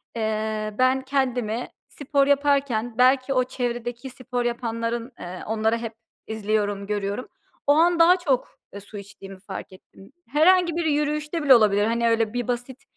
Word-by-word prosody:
eee, 215 -1 -2
ben 255 +1 +3
kendimi 250 -4 -1 0.2
spor 280 -1 0
yaparken 275 -5 +1
belki 255 +1 +3
o 255 -1 +3
çevredeki 240 0 -4
spor 250 -1 -4
yapanların, 235 0 -3
eee, 180 +1 -7
onları 220 +1 +1
hep 230 -1 -6 0.3
izliyorum, 205 -2 -2
görüyorum, 205 +3 -3 0.4
o - - +6
an 335 +3 +3
daha 350 +2 +6
çok, 280 -8 -1
e, 200 - -8
su 205 +1 -11
içtiğimi 195 -1 -11
fark 190 -1 -8
ettim. 195 +1 -17 0.2
Herhangi 340 +5 +4
bir 340 -1 -1
yürüyüşte 300 +1 -1
bile 270 -3 +8
olabilir, 205 -2 +3
hani, 235 +1 +1
öyle 225 -1 +1
bir 245 -2 -2
basit, 245 +2 -4
240 Hz, 155 wpm, -24 LUFS, 215-275 Hz, 0.4 s, bile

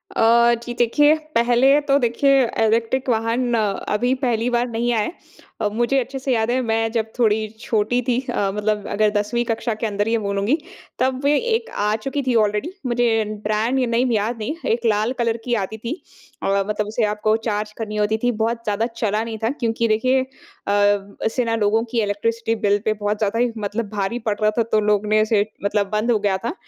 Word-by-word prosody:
अ, 235 +1 +5
जी 240 - -4
देखिए 290 +6 +4 0.2
पहले 245 +4 +4
तो 275 - +4
देखिए 270 +2 +3 0.2
इलेक्ट्रिक 230 +4 0
वाहन 235 +2 0
अभी 210 +3 0
पहली 235 -1 +1
बार 240 0 +1
नहीं 235 +1 -1
आया 220 - +2
है - - -3 0.5
अ, 210 - +2
मुझे 240 +4 +1
अच्छे 270 +2 -4
से 265 0 -1
याद 225 0 +1
है 255 +1 +1
मैं 225 -1 0
जब 220 -1 -2
थोड़ी 220 -2 +2
छोटी 225 +3 0
थी 245 -1 +2
अ, 195 -1 0
मतलब 210 -1 -1
अगर 210 +1 +2
10वीं 225 +4 0
कक्षा 230 +1 -1
के 220 - -4
अंदर 205 0 -1
ये 230 0 +2
बोलूँगी 200 +6 0 0.4
तब 260 +1 0
वे 290 +1 +3
एक 465 0 -1 0.2
आ 210 +1 +2
चुकी 280 +1 -1
थी 245 - +2
ऑलरेडी 210 - -1
मुझे 235 -2 +2 0.2
ब्रांड 220 +5 0
नेम 240 +2 +1
याद 225 +2 0
नहीं 220 +9 -3 0.2
एक 235 +1 -1
लाल 220 +3 +1
कलर 230 -1 +1
की 245 - -1
आती 220 +3 -6
थी 240 - -5 0.4
और 195 0 +1
मतलब 210 0 -2
उसे 220 +2 -1
आपको 210 +1 +1
चार्ज 210 0 -2
करनी 215 -2 -5
होती 210 +1 +1
थी 245 - +3
बहुत 230 +1 -1
ज़्यादा 210 +1 0
चला 215 -1 0
नहीं 225 -1 -5
था 225 - +2
क्योंकि 230 -1 0
देखिए 255 +5 +2
अ, - - -4 1.0
इससे 235 +3 0
ना 230 - 0
लोगों 220 +1 +2
की 235 - +1
इलेक्ट्रिसिटी 225 +2 -1
बिल 205 0 +3
पे 215 - +2
बहुत 210 0 -2
ज़्यादा 215 +2 -1
ही 245 0 +2
मतलब 210 +1 -3
भारी 205 +3 -2
पड़ 205 - -1
रहा 215 0 +3
था 230 - +4
तो 215 - +4
लोगों 210 0 +1
ने 215 0 +4
इसे 215 -1 +2 0.2
मतलब 200 -1 0
बंद 215 +3 0
हो 225 - +3
गया 200 -2 +1
था। 230 +9 -4
225 Hz, 205 wpm, -21 LUFS, 210-240 Hz, 1.0 s, अ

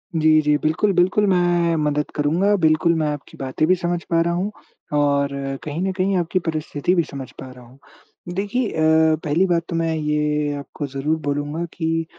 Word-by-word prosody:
जी, 155 0 +3
जी, 150 0 +2
बिल्कुल, 160 +8 +1
बिल्कुल, 185 +4 +3
मैं 175 -2 +2
मदद 150 -1 0
करूँगा। 170 +8 +2
बिल्कुल, 160 +1 +3
मैं 155 - +1
आपकी 145 - -10
बातें 135 +4 -1
भी 185 - +5
समझ 175 -1 -2
पा 165 -1 +3
रहा 170 +1 0
हूँ 190 +4 -1 0.5
और 140 -1 +2 0.3
कहीं 155 +3 -4
न - - 0
कहीं 190 +1 +1
आपकी 175 +2 0
परिस्थिति 155 +2 -1
भी 170 - +3
समझ 135 -3 -8
पा 130 - -8
रहा 125 -1 -14
हूँ। 130 +3 -19 0.6
देखिए 205 +4 -1
अ, 160 0 +3
पहली 160 +5 +2
बात 170 -1 +1
तो 170 - -3
मैं 165 -1 0
ये 150 -1 0
आपको 140 +1 -6
ज़रूर 140 +4 -1
बोलूँगा 145 +3 -2
कि 165 -1 -1
160 Hz, 185 wpm, -21 LUFS, 150-175 Hz, 0.6 s, भी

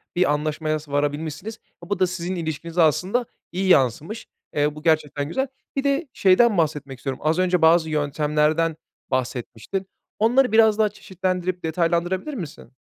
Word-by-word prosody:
bir 175 -5 +3
anlaşmaya 155 +1 -1
s 150 -1 -14
varabilmişsiniz. 150 +9 -2 0.2
A, 170 - -12
bu 200 -2 -1
da 185 - +4
sizin 180 0 -4
ilişkinize 165 +1 -2
aslında 185 - +2 0.3
iyi 190 +2 -1
yansımış. 155 - +2 0.3
Eee, 150 0 +1
bu 150 - -10
gerçekten 150 -3 +1
güzel. 265 - -1 0.3
Bir 275 - 0
de 280 +3 +1
şeyden 200 +3 +4
bahsetmek 145 -5 -1
istiyorum. 135 -1 -4
Az 160 +3 +2
önce 180 -2 +2
bazı 160 0 +5
yöntemlerden 150 +2 +1 0.4
bahsetmiştin. 130 - -3 0.3
Onları 245 +3 +4
biraz 220 -1 +5
daha 215 -1 +4
çeşitlendirip 185 -2 -3
detaylandırabilir 175 - 0
misin? 160 - -8
165 Hz, 150 wpm, -23 LUFS, 150-190 Hz, 0.4 s, bazı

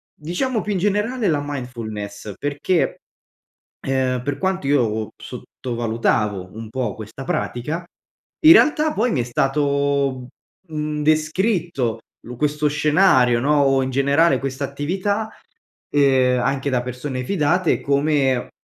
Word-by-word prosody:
diciamo, 210 - -2
più 210 - -3
in 190 - -1
generale 210 +4 0
la 150 -3 +1
mindfulness, 110 -7 -6
perché, 145 +5 0 0.9
uhm, 130 -2 0
per 145 +1 -2
quanto 190 -6 -1
io 110 -6 +1
p - - -17
sottovalutavo 110 -5 -2
un 110 -1 -7
po' 120 -4 -2
questa 110 +4 -9
pratica, 150 +8 -3 0.6
in 320 +1 +9
realtà 305 -3 +4
poi 240 +3 +1
mi 135 - 0
è - - -1
stato, 140 0 0 0.4
mhmm, 150 -1 -3
descritto 155 - 0 0.3
lo 125 - -8
questo 150 +1 0
scenario, 145 -5 +3
no, 145 +3 +2
o 135 -1 +3
in 130 - -2
generale 140 +2 +3
questa 135 +1 -3
attività, 190 +10 -2 0.6
ehm, 130 -3 +3
anche 135 +2 -1
da 125 -1 +1
persone 125 +1 -5
fidate, 175 +1 +1
come 140 -3 +1
140 Hz, 130 wpm, -21 LUFS, 125-160 Hz, 0.9 s, in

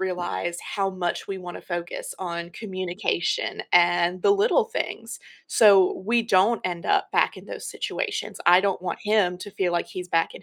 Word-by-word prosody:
realize 175 -2 -3
how 195 -2 -2
much 180 -2 -3
we 195 - -3
wanna 180 -1 -8
focus 175 -1 -5
on 170 -2 -5
communication 185 -2 -2
and 175 +1 +3
the - - +4
little 435 +4 +3
things, 460 +1 -5 0.3
so 200 -4 +5
we 230 +3 +2
don't 215 +1 +3
end 175 -2 -3
up - - +1
back - - +2
in - - -12
those - - -7
situations, - - -4
I 180 +1 +7
don't 195 -1 0
want 180 -2 -4
him 205 -4 +2
to 205 - -8
feel 185 -2 -1
like 175 - 0
he's 180 -1 -7
back 165 -1 +1
in - - -11
185 Hz, 180 wpm, -24 LUFS, 175-200 Hz, 0.3 s, I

